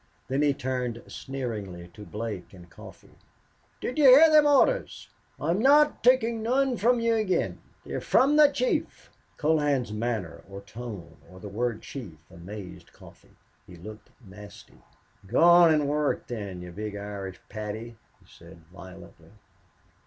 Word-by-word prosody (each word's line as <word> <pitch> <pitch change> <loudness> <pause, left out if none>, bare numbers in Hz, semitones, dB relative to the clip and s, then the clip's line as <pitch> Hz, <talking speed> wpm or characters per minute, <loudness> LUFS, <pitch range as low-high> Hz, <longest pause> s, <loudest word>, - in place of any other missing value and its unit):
Then 135 +2 0
he 145 -1 +3
turned 125 -3 -4
sneeringly 105 -10 -6
to 105 +3 -13
Blake 105 -4 -6
and 90 -1 -14
Coffee. - - -15 0.6
"Did 255 - -4
you 295 - +4
hear 285 +5 +8
them 305 -1 +6
orders? 290 - +1 0.3
I'm 170 +4 0
not 295 +5 +4
takin' 235 -3 +3
none 255 +3 +1
from 240 +3 +2
you 230 0 +1
again. 215 -5 -1 0.2
They're - - -5
from 280 +3 +3
the 300 -1 +7
chief." 255 -3 -3 0.3
Colohan's 145 -7 0
manner 110 -6 -4
or 100 0 -9
tone 100 -5 -9
or 95 +1 -14
the 105 - -9
word 115 +2 -3
chief 110 - -9
amazed 95 +3 -10
Coffee. - - -18 0.3
He 90 - -13
looked 105 +6 -12 0.2
nasty. 100 +1 -14 0.5
"Go 120 +10 +2
on 170 -1 +7
and 150 -2 +2
work, 150 0 -1
then, 100 -6 -6
you 90 - -9
big 105 +3 -6
Irish 100 -2 -7
Paddy," 110 +2 -7 0.2
he - - -26
said, - - -16 0.2
violently. 90 -3 -14
120 Hz, 145 wpm, -26 LUFS, -, 0.6 s, hear